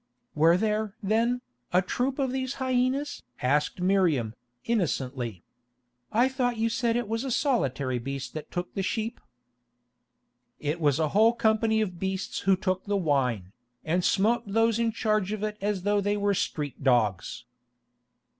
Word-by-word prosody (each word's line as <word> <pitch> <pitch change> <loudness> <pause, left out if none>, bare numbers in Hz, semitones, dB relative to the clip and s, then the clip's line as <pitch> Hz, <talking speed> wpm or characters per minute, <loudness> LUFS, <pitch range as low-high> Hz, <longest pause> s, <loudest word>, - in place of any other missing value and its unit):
"Were 165 +3 +5
there, 215 0 -1
then, 230 +5 +1 0.3
a 180 +2 +4
troop 255 +8 -1
of 270 -3 0
these 260 0 -2
hyenas?" 260 +2 0 0.2
asked 145 +7 +1
Miriam, 175 - +2 0.3
innocently. 130 - -1 0.7
"I 240 +4 +4
thought 250 -3 -1
you 225 +1 +1
said 230 0 0
it 240 -2 -1
was 225 +3 -2
a 270 - -3
solitary 140 - 0
beast 135 +2 -5
that 155 - -7
took 175 0 -4
the 195 - -2
sheep." 225 +4 -3 1.4
"It 150 +3 -2
was 145 -3 +3
a 160 -2 +1
whole 220 +6 +5
company 220 -1 +2
of 180 -5 -3
beasts 190 0 -2
who 195 -1 +3
took 185 -1 -1
the 205 -1 0
wine, 130 - 0 0.3
and 175 +3 +1
smote 220 +6 +2
those 225 +2 +2
in 230 -1 +2
charge 215 -3 0
of 215 -1 -4
it 210 0 -2
as 200 -2 -1
though 205 0 +2
they 205 +1 0
were 205 0 +1
street 150 -6 -3
dogs." 120 -2 +1
200 Hz, 155 wpm, -27 LUFS, 155-230 Hz, 1.4 s, Were